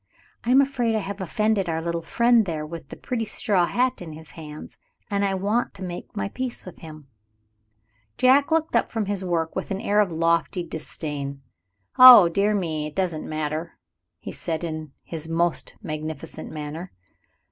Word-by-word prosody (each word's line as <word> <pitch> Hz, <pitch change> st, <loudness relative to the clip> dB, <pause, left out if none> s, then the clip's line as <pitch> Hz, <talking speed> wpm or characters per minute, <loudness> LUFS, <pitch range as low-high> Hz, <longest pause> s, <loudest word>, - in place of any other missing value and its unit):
I 235 Hz, -, -3 dB
am 265 Hz, +2 st, +7 dB
afraid 245 Hz, -5 st, 0 dB
I -, -, +2 dB
have 200 Hz, 0 st, -6 dB
offended 205 Hz, 0 st, 0 dB
our 160 Hz, 0 st, -1 dB
little 170 Hz, 0 st, -2 dB
friend 235 Hz, +5 st, +3 dB
there, 155 Hz, -3 st, -3 dB
with 165 Hz, -2 st, -8 dB
the -, -, -7 dB
pretty 240 Hz, -3 st, -3 dB
straw 200 Hz, -5 st, +1 dB
hat 255 Hz, -1 st, 0 dB
in 165 Hz, -3 st, -7 dB
his 160 Hz, +1 st, -12 dB
hand, 155 Hz, -2 st, -10 dB, 0.4 s
and 200 Hz, 0 st, +1 dB
I 195 Hz, -1 st, +1 dB
want 205 Hz, +5 st, -1 dB
to -, -, -8 dB
make 175 Hz, -1 st, -7 dB
my 100 Hz, -, -1 dB
peace 255 Hz, -2 st, -4 dB
with 185 Hz, -, -11 dB
him." 155 Hz, -3 st, -11 dB, 1.1 s
Jack 270 Hz, +4 st, +5 dB
looked 320 Hz, 0 st, +1 dB
up -, -, +2 dB
from 220 Hz, -2 st, -2 dB
his 195 Hz, -1 st, -2 dB
work 165 Hz, -3 st, -1 dB
with 190 Hz, -, -3 dB
an 195 Hz, -, -2 dB
air 205 Hz, 0 st, +1 dB
of 205 Hz, -4 st, +3 dB
lofty 165 Hz, +2 st, +1 dB
disdain. 145 Hz, -4 st, -6 dB, 0.6 s
"Oh, 245 Hz, -8 st, +11 dB
dear 200 Hz, +5 st, +1 dB
me, 160 Hz, -6 st, -2 dB
it 150 Hz, -, -11 dB
doesn't 180 Hz, -5 st, -2 dB
matter," 155 Hz, +2 st, -3 dB, 0.4 s
he -, -, -8 dB
said, 165 Hz, -1 st, -4 dB
in 155 Hz, -3 st, -5 dB
his 160 Hz, -1 st, -5 dB
most 170 Hz, +1 st, 0 dB
magnificent 155 Hz, -1 st, -5 dB
manner. 155 Hz, +4 st, -6 dB
175 Hz, 180 wpm, -24 LUFS, 160-210 Hz, 1.1 s, Oh